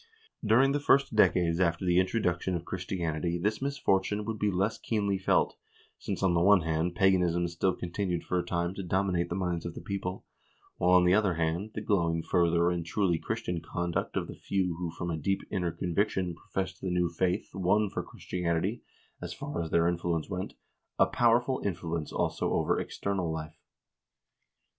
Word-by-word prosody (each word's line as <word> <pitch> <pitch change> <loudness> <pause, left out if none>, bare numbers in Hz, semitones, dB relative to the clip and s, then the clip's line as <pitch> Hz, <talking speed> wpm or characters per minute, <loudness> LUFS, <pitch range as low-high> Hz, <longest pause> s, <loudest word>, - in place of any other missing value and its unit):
During 120 +5 +4
the 145 - +1
first 140 -4 +3
decades 85 -5 +3
after 85 0 +1
the 90 0 +4
introduction 95 -2 0
of 85 0 -4
Christianity 85 -2 -2
this 105 +6 -1
misfortune 105 -7 0
would 110 -1 -4
be 105 - +2
less 100 +3 0
keenly 100 -3 0
felt, 95 - +2 0.4
since, - - -4
on 95 -2 +3
the 85 - +2
one 100 +1 +6
hand, 80 +2 -1
paganism 90 -3 +3
still 85 +2 0
continued 90 0 -2
for 90 - 0
a - - -1
time 85 +1 -1
to 100 - -5
dominate 90 -1 0
the 85 - -2
minds 90 -3 -1
of 85 - -6
the - - -6
people, 95 -2 -4 0.5
while, 90 - +2
on 90 -1 +6
the 90 - +5
other 100 -3 +3
hand, 85 +6 -1
the - - -3
glowing 85 -5 +1
fervor 85 0 +2
and 85 -1 -2
truly 85 0 0
Christian 85 +1 -3
conduct 85 0 -2
of - - 0
the - - -7
few 95 -3 -1
who 85 -1 -3
from 85 +1 -4
a 80 - -2
deep 95 +6 0
inner 90 -4 0
conviction 90 +1 -1
professed 95 +2 -5
the 95 - -2
new 90 0 +2
faith 90 +2 -1
won 95 +3 +2
for - - -3
Christianity, 90 +5 -2 0.4
as - - -5
far 85 - -4
as 80 - -4
their 85 +1 +3
influence 85 -2 -1
went, 95 -1 -5 0.4
a - - +6
powerful 120 +2 +2
influence 85 -4 -3
also - - -1
over - - +1
external 95 -4 -2
life. 80 -1 -6
90 Hz, 180 wpm, -29 LUFS, 85-100 Hz, 0.5 s, one